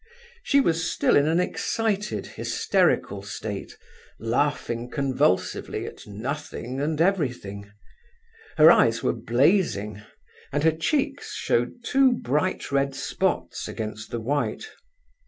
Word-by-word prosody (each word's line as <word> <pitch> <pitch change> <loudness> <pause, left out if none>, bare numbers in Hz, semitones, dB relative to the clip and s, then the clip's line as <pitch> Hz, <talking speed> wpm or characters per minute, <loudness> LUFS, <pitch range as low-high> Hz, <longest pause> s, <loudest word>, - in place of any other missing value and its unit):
She 280 -11 +3
was 165 -10 +1
still - - +2
in 145 +1 +4
an 165 +2 +2
excited, 210 +2 -1
hysterical - - 0
state, - - -6 0.4
laughing 120 0 -1
convulsively 130 -10 0
at - - -10
nothing 130 +3 -5
and 155 +1 -1
everything. 125 - -1 0.9
Her 155 +1 +9
eyes 115 -7 +3
were - - +2
blazing, 115 - +1 0.5
and 145 +1 0
her 160 - +5
cheeks 275 - -1
showed 120 - -1
two 270 0 +4
bright 150 - -1
red 140 0 +1
spots - - -2
against 110 0 -6
the 120 - -3
white. 145 - -2
145 Hz, 115 wpm, -25 LUFS, 115-180 Hz, 0.9 s, Her